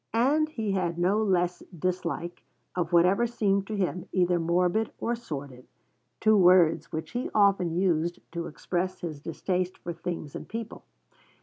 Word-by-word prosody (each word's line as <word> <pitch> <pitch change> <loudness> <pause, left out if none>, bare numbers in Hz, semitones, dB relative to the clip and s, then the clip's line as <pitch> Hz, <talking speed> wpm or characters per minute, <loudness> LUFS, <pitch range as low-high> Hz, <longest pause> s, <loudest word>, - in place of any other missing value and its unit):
And 295 +7 +3
he 225 -9 -2
had 175 -3 -1
no 190 +5 +2
less 180 -4 +1 0.2
dislike 175 0 -3 0.3
of 175 -1 -1
whatever 180 +7 +4
seemed 200 -4 0
to 215 - -3
him 185 -1 -2
either 180 -1 +2
morbid 180 +6 +1
or 235 - -1
sordid, 140 - -7 0.5
two 220 0 +4
words 180 -4 +5
which 160 0 -4
he 245 +2 -2
often 200 -4 +4
used 175 -2 +1
to 170 0 -4
express 185 +4 -3
his 160 -4 -5
distaste 180 +4 -2
for 170 - -6
things 165 -3 -5
and - - -7
people. 225 0 -6
180 Hz, 150 wpm, -28 LUFS, 170-205 Hz, 0.5 s, words